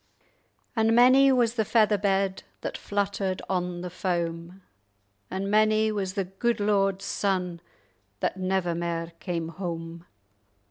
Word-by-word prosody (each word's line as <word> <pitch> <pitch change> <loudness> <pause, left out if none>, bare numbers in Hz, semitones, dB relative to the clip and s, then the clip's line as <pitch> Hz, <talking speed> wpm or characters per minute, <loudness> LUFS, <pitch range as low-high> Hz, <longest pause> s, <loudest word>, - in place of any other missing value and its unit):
"And 225 0 +3
many 260 +3 +7
was 240 -3 +3
the 225 -2 +1
feather 215 -1 +3
bed 195 -1 +1 0.2
That - - -4
fluttered 200 -2 -2
on 180 -2 -2
the 180 0 -6
foam; 175 0 -3 0.7
And 190 +1 -3
many 215 +1 +3
was 195 -2 -3
the 195 - 0
gude 210 +5 -1
lord's 195 -2 +1
son 180 -4 -1 0.6
That - - -1
never 185 -2 0
mair 170 0 -3
came 170 -3 -3
home! 170 -1 -6
190 Hz, 130 wpm, -27 LUFS, 175-210 Hz, 0.7 s, many